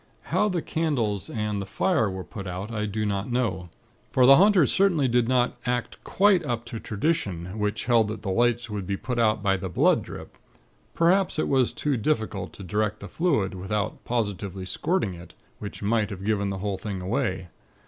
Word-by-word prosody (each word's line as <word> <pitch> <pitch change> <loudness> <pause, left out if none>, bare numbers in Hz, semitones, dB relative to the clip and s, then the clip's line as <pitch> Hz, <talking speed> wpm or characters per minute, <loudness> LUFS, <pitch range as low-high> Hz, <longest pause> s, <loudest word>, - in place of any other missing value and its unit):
How 210 - +3
the 175 -4 -1
candles 120 - -1
and 105 -2 -2
the - - -4
fire 115 - +1
were 95 -1 -5
put 100 +4 -8
out, 95 +5 -5
I 105 -2 -2
do 105 +1 -2
not 100 +3 -2
know; 95 -9 -1 0.4
for 130 - +4
the 135 +2 +9
haunters 190 -6 +5
certainly 180 -8 +3
did 120 -1 +2
not 125 -1 +2
act 125 0 -3
quite 195 -3 +3
up 120 -4 -3
to 115 - -6
tradition, 105 - -2
which 105 +1 -1
held 115 -3 +4
that 105 +1 -6
the 95 - -2
lights 120 +3 +2
were 105 -2 -4
put 100 +6 -3
out 110 -2 +2
by 95 -1 +2
the 95 0 -5
'blood 85 - +3
drip.' - - -10 0.6
Perhaps 180 +2 +3
it - - 0
was 130 -3 +2
too 145 -3 -1
difficult 110 -7 -1
to 100 - -9
direct 105 +3 -1
the 100 - -8
fluid, 140 - 0
without 95 +2 -3
positively 100 -5 -3
squirting 110 - -1
it, 85 0 -12 0.2
which 100 0 -7
might 105 0 +1
have 100 -2 -7
given 100 -2 +1
the 95 - -3
whole 100 -2 -2
thing 100 -2 -4
away. 95 -3 -2
110 Hz, 190 wpm, -26 LUFS, 100-125 Hz, 0.6 s, the